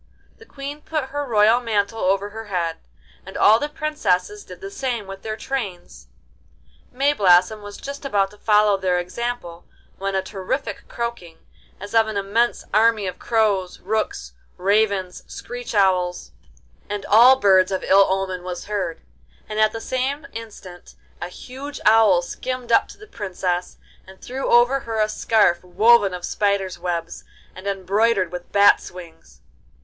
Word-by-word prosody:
The 450 - -16
Queen 285 +2 -7
put 300 -5 -3
her 290 0 -3
royal 220 +1 +4
mantle 225 -2 -1
over 195 +2 0
her 225 +1 -8
head, 175 -5 -2 0.5
and - - -9
all 220 +2 +6
the 295 - -3
princesses 305 - -1
did - - -12
the 395 -1 -8
same 250 - -3
with 195 0 -9
their 215 0 -5
trains. 200 - -6 0.8
Mayblossom 210 -7 +3
was 205 0 -9
just 280 +1 -8
about 200 -8 0
to 210 - -18
follow 210 -2 +3
their 185 -2 0
example 180 -2 -5 0.3
when 195 0 -2
a 190 - 0
terrific 205 +4 -4
croaking, 235 -9 -5 0.4
as 205 +2 -9
of 225 -1 +4
an 215 -2 -3
immense 210 +5 0
army 220 -1 +3
of 185 -1 -5
crows, 205 -5 0
rooks, 190 - -3 0.2
ravens, 200 -2 +1
screech 245 -2 -7
owls, 180 - +1 0.6
and 205 -1 -4
all 240 +5 +7
birds 190 -6 +4
of 190 - -2
ill 195 0 +5
omen 190 -1 -2
was 180 -1 -6
heard, 195 -6 -4 0.4
and 215 0 -4
at 215 0 +4
the 225 - -6
same 260 +5 -2
instant 205 -6 -10 0.3
a - - -3
huge 265 +9 -9
owl 215 -5 +5
skimmed 255 +5 -5
up - - +4
to - - -13
the 425 - -13
Princess, 185 - -4 0.3
and 190 0 -14
threw 265 +2 -5
over 240 +3 +4
her 225 -3 -4
a 215 - +3
scarf 215 -4 +2
woven 210 +3 +4
of 180 -1 -5
spiders' 200 -3 -1
webs 170 -1 -4 0.3
and 185 +2 -9
embroidered 200 0 +1
with 180 0 -8
bats' 200 0 +4
wings. 165 - -14
205 Hz, 155 wpm, -22 LUFS, 185-235 Hz, 0.8 s, all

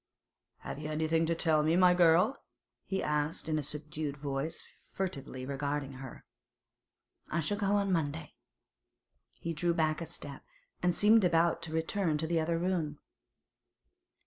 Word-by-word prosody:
'Have - - -6
you 155 0 -5
anything 160 +1 +1
to 165 - +1
tell 160 -2 +3
me, 155 +2 +2
my 180 0 +6
girl?' 180 +7 +5 0.5
he 195 - -2
asked 150 +2 -1
in 155 -1 +1
a - - -1
subdued 150 0 -5
voice, 140 +3 -3 0.3
furtively 140 -9 -4
regarding 140 0 -2
her. 130 - -10 1.0
'I 165 - 0
shall 205 +7 -1
go 200 -1 +2
on 200 -1 +1
Monday.' 155 -2 -1 1.0
He 165 - -5
drew 170 +2 0
back 155 0 +1
a 165 - -4
step, 145 -3 -6 0.4
and 180 -1 +2
seemed 215 +1 +5
about 170 -1 +3
to 160 - -5
return 160 0 0
to 160 - -2
the 165 0 +1
other 165 +1 0
room. 165 -4 -1
160 Hz, 150 wpm, -32 LUFS, 150-175 Hz, 1.0 s, my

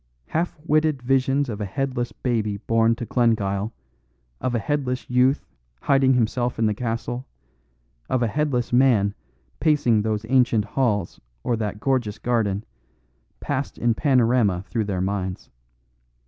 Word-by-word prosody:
Half 170 +2 -1
witted 155 -3 +2
visions 135 +2 +2
of 110 -3 -5
a - - -1
headless 125 +3 -2
baby 110 -5 -1
born 115 +2 +2
to 120 - -5
Glengyle, 110 -4 +1 0.7
of 125 -1 -1
a - - +3
headless 130 0 -2
youth 125 +3 +3 0.4
hiding 135 -1 +3
himself 120 +1 0
in 115 - +1
the 105 - +2
castle, 120 +2 -4 0.8
of 130 -1 +1
a - - +2
headless 125 -1 -1
man 120 -6 +4 0.5
pacing 145 -9 +3
those 110 0 -2
ancient 125 -4 +3
halls 105 -6 -1 0.2
or 120 - +1
that 105 -2 -3
gorgeous 120 -5 0
garden, 110 -5 0 0.8
passed 140 +1 -3
in 120 -1 +2
panorama 120 - +2
through 110 0 -1
their 95 -3 -2
minds. 95 -1 -3
120 Hz, 135 wpm, -23 LUFS, 105-130 Hz, 0.8 s, man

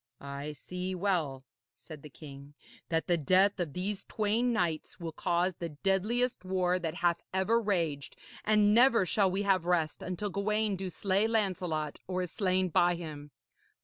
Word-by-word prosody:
'I 140 +2 -6
see 180 +5 -5
well,' 165 -9 -1 0.3
said 155 -3 -11
the 150 - -11
king, 140 0 -12 0.3
'that 165 -1 0
the 175 - +2
death 185 +6 +3
of 165 -6 -2
these 195 +2 -3
twain 220 +3 0
knights 175 -9 -2
will 165 -2 -5
cause 175 +3 0
the 170 - -4
deadliest 215 +5 +1
war 185 -1 +1
that 165 -2 -3
hath 175 -1 +1
ever 200 +5 +2
raged, 165 -10 -1 0.3
and 210 -1 +4
never 235 -3 +6
shall 195 +2 +2
we 195 +2 -1
have 190 -4 +2
rest 165 -4 0
until 185 +3 -4
Gawaine 210 +1 0
do 190 0 -4
slay 195 +4 +1
Lancelot 180 -9 -1
or 185 0 -1
is 180 - -6
slain 185 -2 +1
by 175 +2 +3
him. 150 -4 -8
185 Hz, 165 wpm, -30 LUFS, 165-200 Hz, 0.3 s, never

